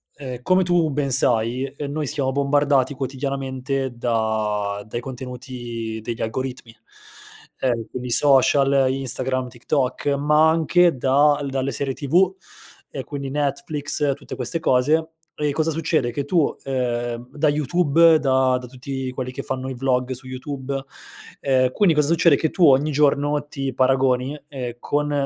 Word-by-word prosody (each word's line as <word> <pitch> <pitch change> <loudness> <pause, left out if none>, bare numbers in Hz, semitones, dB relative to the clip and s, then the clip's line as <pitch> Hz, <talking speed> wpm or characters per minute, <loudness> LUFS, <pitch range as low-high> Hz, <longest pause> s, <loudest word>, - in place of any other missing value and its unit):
ehm, 130 -3 -7
come 185 +4 +3
tu 175 -3 +2
ben 140 -1 -1
sai, 120 +1 +1
ehm, 140 +1 -6
noi 150 +1 -2
siamo 135 -2 0
bombardati 140 -1 +2
quotidianamente 135 0 -3
da 110 -3 -1
dai 120 +2 -4
contenuti 120 -3 -6
degli 115 +1 -5
algoritmi, 125 0 -4 0.8
ehm, 120 -3 0
quindi 125 -1 -5
social, 135 +1 +4
Instagram, 130 -1 -2
TikTok, 130 +3 -2
ma 150 +2 +4
anche 165 0 +3
da 145 +3 +3
dalle 135 0 -2
serie 135 +2 -2
TV 175 +8 +2 0.6
e 135 - -6
quindi 140 -1 -6
Netflix 145 0 -1
tutte 140 - -9
queste 130 +6 -2
cose; 155 +5 +2 0.3
e 150 -1 -1
cosa 160 +2 0
succede: 155 -5 0
che 140 +4 -3
tu 160 0 +1
ehm, 120 -2 -2
da 150 +1 +3
YouTube, 160 +2 +4
da 130 -2 +2
da 125 - -9
tutti 130 +1 -5
quelli 130 0 -5
che - - -6
fanno 130 0 -4
i 130 - -4
vlog 125 0 0
su 130 +1 -7
YouTube, 135 +1 -5 0.6
ehm, 130 -2 +2
quindi 175 0 +3
cosa 150 0 +3
succede: 165 -2 +5
che 160 - 0
tu 180 -4 +3
ogni 140 +2 +4
giorno 145 0 +1
ti 135 -3 -4
paragoni, 130 +2 +1
ehm, 125 -5 -5
con, 145 0 -1
135 Hz, 145 wpm, -22 LUFS, 125-145 Hz, 0.8 s, succede